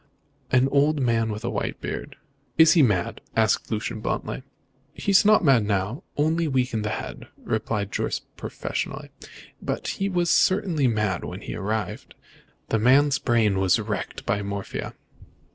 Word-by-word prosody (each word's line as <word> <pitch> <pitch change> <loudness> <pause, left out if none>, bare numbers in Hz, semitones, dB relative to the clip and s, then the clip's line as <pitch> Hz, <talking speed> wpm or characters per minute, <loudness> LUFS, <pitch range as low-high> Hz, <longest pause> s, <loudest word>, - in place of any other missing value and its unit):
"An 130 +1 +4
old 145 +2 +2
man 115 -3 +1
with 105 +1 -6
a - - 0
white - - -3
beard." - - -5 0.4
"Is 160 0 +7
he 170 - +5
mad?" 100 -10 +1
asked 110 -3 +2
Lucian 110 +1 -3
bluntly. 115 - -3 0.5
"He 200 - -1
is 195 - +6
not 210 -1 +5
mad 135 -7 +5
now, 100 - -1 0.2
only 160 +3 +1
weak 130 -2 0
in 110 - 0
the 105 - -2
head," - - -6 0.2
replied 105 -2 -2
Jorce - - -1 0.2
professionally, - - -5 0.5
"but - - -3
he 195 0 -1
was 175 -2 +1
certainly 185 -8 +3
mad 105 -6 0
when - - -6
he - - -6
arrived. 110 +2 -4 0.5
The 110 - +1
man's 135 +5 +4
brain 110 -4 +2
is 95 0 +3
wrecked 105 -1 -4
by 100 +1 0
morphia." 100 0 -5
115 Hz, 160 wpm, -25 LUFS, 105-145 Hz, 0.5 s, Is